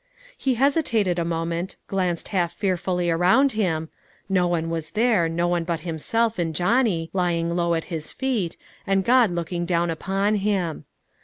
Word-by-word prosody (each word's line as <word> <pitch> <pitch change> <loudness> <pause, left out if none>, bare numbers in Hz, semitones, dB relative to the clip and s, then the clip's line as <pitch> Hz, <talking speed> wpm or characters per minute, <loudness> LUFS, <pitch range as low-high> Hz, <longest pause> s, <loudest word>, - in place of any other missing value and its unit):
He 265 -2 0
hesitated 230 - +2
a - - +1
moment, 170 +2 -2
glanced 180 -3 -2
half 175 -3 0
fearfully 180 -2 0
around 185 +12 +4
him, 165 -8 -1 0.4
no 185 -2 +2
one 165 -1 -1
was 160 -2 -3
there, 215 -8 +3
no 170 +1 0
one 175 -1 +1
but 165 -1 -2
himself, 215 +7 -1
and 165 -2 -1
Johnny, 180 - +1
lying 170 -2 0
low 170 -1 +1
at 165 - -2
his 155 -2 -5
feet, 240 -11 -2 0.3
and 195 -1 +2
God 245 -3 +5
looking 175 0 -3
down 170 -1 +1
upon 195 +5 0
him. 190 -7 -1
175 Hz, 160 wpm, -24 LUFS, 170-205 Hz, 0.4 s, God